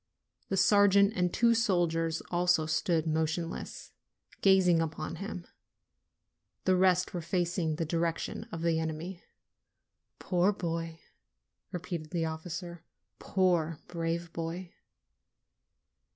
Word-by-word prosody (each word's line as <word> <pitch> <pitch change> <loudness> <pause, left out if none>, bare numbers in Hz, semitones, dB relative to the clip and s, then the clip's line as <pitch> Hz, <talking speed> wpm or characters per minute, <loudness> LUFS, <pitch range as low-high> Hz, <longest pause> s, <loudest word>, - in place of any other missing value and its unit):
The 195 - 0
sergeant 200 +1 +5
and 180 -1 +1
two 235 +4 +4
soldiers 170 -7 +1
also 175 -2 +3
stood 160 +1 +1
motionless, 160 +2 -2 0.5
gazing 185 -4 +5
upon 160 0 -4
him. 185 -2 -6 1.2
The 185 - +4
rest 185 0 +3
were 175 - -3
facing 175 -1 -1
the 165 - -2
direction 165 +1 -2
of 165 0 -5
the 165 -1 +2
enemy. 160 +3 -4 0.9
"Poor 180 +2 +2
boy!" 165 -3 -4 0.7
repeated 170 -3 -5
the 170 -3 -1
officer. 170 +2 -6 0.4
"Poor, 175 -4 +1
brave 170 0 -3
boy 170 +2 -5
170 Hz, 105 wpm, -30 LUFS, 165-185 Hz, 1.2 s, sergeant